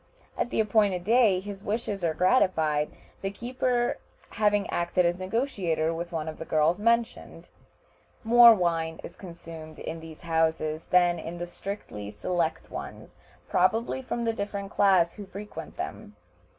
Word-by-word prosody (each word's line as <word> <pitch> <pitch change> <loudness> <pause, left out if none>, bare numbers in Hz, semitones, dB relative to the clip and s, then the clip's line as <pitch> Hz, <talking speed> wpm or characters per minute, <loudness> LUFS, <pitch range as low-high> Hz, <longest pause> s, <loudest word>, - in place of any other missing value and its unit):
At - - -1
the - - -1
appointed 205 -4 +2
day 220 -2 +4
his 200 0 -8
wishes 205 -3 -3
are 160 -2 +1
gratified, 160 -7 +2 0.3
the 195 - -1
keeper 240 +3 -1 0.3
having 205 -2 +2
acted 175 +1 +1
as 175 +1 +1
negotiator 185 - -1
with 170 +1 -5
one 160 -2 -3
of 155 - -6
the - - -4
girls 160 +3 +2
mentioned. 230 +1 -1 0.7
More 235 +1 +9
wine 165 -3 -1
is 170 - -9
consumed 165 -3 -10
in 165 +1 -6
these 160 -1 -11
houses 160 -1 0
than 175 -1 +3
in 170 +1 -6
the 175 - -4
strictly 175 - -7
select 160 - -2
ones, - - -8 0.3
probably 225 +8 +1
from 240 -2 -3
the 225 - +1
different 200 -2 -4
class 185 -4 +4
who 205 -2 -9
frequent 200 +2 -8
them. - - -6
180 Hz, 150 wpm, -27 LUFS, 165-210 Hz, 0.7 s, More